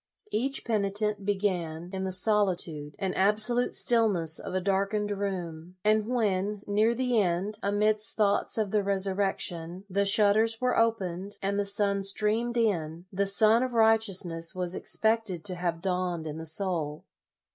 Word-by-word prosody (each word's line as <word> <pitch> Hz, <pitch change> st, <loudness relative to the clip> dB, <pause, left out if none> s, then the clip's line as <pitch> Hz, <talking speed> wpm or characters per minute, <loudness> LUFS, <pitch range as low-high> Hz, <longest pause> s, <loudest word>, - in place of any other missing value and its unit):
Each 270 Hz, +5 st, -1 dB
penitent 210 Hz, -1 st, -1 dB
began 180 Hz, -4 st, -2 dB
in 190 Hz, 0 st, -3 dB
the 190 Hz, -, -3 dB
solitude 185 Hz, -7 st, 0 dB
and 190 Hz, -2 st, -3 dB
absolute 215 Hz, +5 st, +2 dB
stillness 200 Hz, -9 st, +2 dB
of -, -, -6 dB
a -, -, +2 dB
darkened 200 Hz, +2 st, -1 dB
room, 180 Hz, -4 st, -5 dB
and 215 Hz, 0 st, +2 dB
when, 210 Hz, -4 st, -1 dB
near 215 Hz, +3 st, +1 dB
the 250 Hz, -2 st, +1 dB
end, 190 Hz, +4 st, -2 dB
amidst 210 Hz, +2 st, +1 dB
thoughts 205 Hz, 0 st, +1 dB
of 210 Hz, -3 st, -1 dB
the 210 Hz, -, +2 dB
resurrection, 190 Hz, -3 st, -1 dB
the 200 Hz, +1 st, 0 dB
shutters 215 Hz, +2 st, +4 dB
were 250 Hz, 0 st, 0 dB
opened, 200 Hz, -4 st, -1 dB
and 200 Hz, +1 st, -2 dB
the 205 Hz, -, 0 dB
sun 200 Hz, 0 st, +1 dB
streamed 215 Hz, +4 st, 0 dB
in, 170 Hz, -7 st, -1 dB
the 200 Hz, +1 st, 0 dB
sun 215 Hz, +3 st, +4 dB
of 255 Hz, -2 st, -3 dB
righteousness 195 Hz, -7 st, +1 dB
was 180 Hz, -1 st, -3 dB
expected 220 Hz, -5 st, +1 dB
to 190 Hz, -, -1 dB
have 175 Hz, -1 st, -3 dB
dawned 180 Hz, -3 st, -2 dB
in 155 Hz, 0 st, -6 dB
the 160 Hz, -, -5 dB
soul. 160 Hz, -3 st, 0 dB
200 Hz, 150 wpm, -27 LUFS, 180-215 Hz, -, shutters